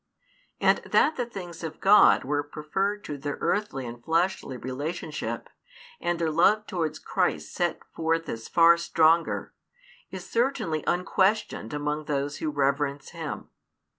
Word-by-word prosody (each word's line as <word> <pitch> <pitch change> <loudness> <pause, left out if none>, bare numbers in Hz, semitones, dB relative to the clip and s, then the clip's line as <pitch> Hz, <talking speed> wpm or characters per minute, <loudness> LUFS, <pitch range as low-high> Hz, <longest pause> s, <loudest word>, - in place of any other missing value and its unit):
And - - +4
that 310 - +2
the 245 -2 -2
things 175 -7 -8
of 160 -1 -6
God 205 +2 +6
were 145 +2 0
preferred 190 +8 -3
to 145 -2 -6
their 145 +1 -4
earthly 205 -11 -1
and 120 0 -8
fleshly 165 -4 0
relationship, 150 +5 -4 0.5
and 175 0 -1
their 165 -2 0
love 210 +7 +4
towards 170 -7 -2
Christ - - -1
set - - -1
forth 165 0 0
as 115 -4 -5
far 170 0 +6
stronger, 165 0 +2 0.6
is 190 -1 -8
certainly 230 - 0
unquestioned 190 - +1
among 150 +1 -2
those 145 0 -2
who 155 - -2
reverence 140 0 0
Him. - - -6
160 Hz, 135 wpm, -27 LUFS, 145-185 Hz, 0.6 s, God